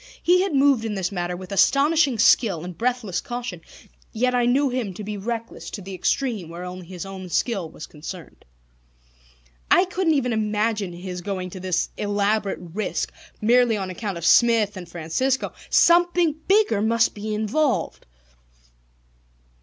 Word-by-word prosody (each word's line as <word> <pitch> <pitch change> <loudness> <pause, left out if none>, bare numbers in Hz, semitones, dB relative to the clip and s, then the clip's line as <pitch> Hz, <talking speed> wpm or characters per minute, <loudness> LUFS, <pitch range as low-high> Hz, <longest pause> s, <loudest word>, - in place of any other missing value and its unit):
He 360 +1 +4
had 380 -6 -1
moved 275 -4 +4
in 220 -2 -3
this 190 -1 -2
matter 175 -2 -3
with 185 +1 -10
astonishing 275 - +3
skill 200 -5 +4
and 180 -1 -7
breathless 230 -3 -1
caution; 245 0 -6 0.5
yet 250 +3 0
I 245 -1 +2
knew 270 +3 +3
him 240 -7 -3
to 210 - -7
be 210 +1 -5
reckless 230 +3 -5
to 205 - -7
the 195 +1 -8
extreme 210 - -1
where 170 +2 -7
only 180 -1 -8
his 185 0 -7
own 190 -1 -8
skill 195 -3 -1
was 155 - -9
concerned. 160 +3 -10 1.3
I 365 - +5
couldn't 360 -3 +1
even 250 -4 0
imagine 215 -2 0
his 180 0 -6
going 185 -1 -4
to 185 - -8
this 180 -2 -1
elaborate 205 0 0
risk 180 +4 -4 0.3
merely 235 0 +4
on 190 -2 -4
account 195 -1 -4
of 170 - -5
Smith 225 -2 +4
and 180 -2 -8
Francisco. 175 +11 -1 0.2
Something 345 -1 +4
bigger 390 - +3
must 230 +1 +2
be 215 +1 -4
involved. 235 - -1
215 Hz, 155 wpm, -23 LUFS, 185-250 Hz, 1.3 s, I